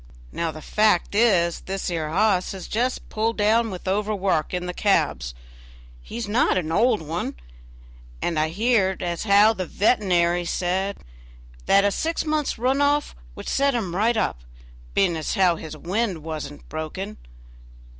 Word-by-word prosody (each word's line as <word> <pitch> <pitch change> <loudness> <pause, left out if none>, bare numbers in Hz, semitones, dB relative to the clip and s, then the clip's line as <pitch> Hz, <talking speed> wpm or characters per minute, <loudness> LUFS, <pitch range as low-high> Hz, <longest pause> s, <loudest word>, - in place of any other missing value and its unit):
Now 170 -1 -2
the 155 -1 -8
fact 210 -5 +2
is, 190 -6 +3
this 190 -1 -4
'ere 160 -3 -2
hoss 195 +1 +1
is 190 - -8
just 245 +4 -1
pulled 225 +1 -1
down 225 +2 +3
with 185 -1 -8
overwork 195 -4 0
in 180 -1 -3
the 180 - -4
cabs; 150 - 0 0.7
he's 230 - -6
not 215 0 +2
an 160 -3 -2
old 225 +1 +2
one, 160 +3 -4 0.8
and 165 -3 -1
I 155 +1 +1
heerd 195 0 +1
as 175 +3 -3
how 205 +2 +6
the 185 -5 -4
vetenary 175 -5 +2
should - - -3
say, 190 +2 -1 0.7
that 200 +1 +5
a 205 - +3
six 325 - -2
months' 305 -4 -1
run 260 +4 +1
off 290 +1 +1 0.2
would - - -9
set 275 -1 +2
him 190 -7 -2
right 225 +4 +2
up, 140 - 0 0.6
being 185 -4 +3
as 160 -2 -2
how 185 -3 +4
his 155 -1 -8
wind 185 -1 -2
was 155 -3 -5
not 145 - -14
broken. 170 +7 -5
195 Hz, 165 wpm, -24 LUFS, 170-220 Hz, 0.8 s, how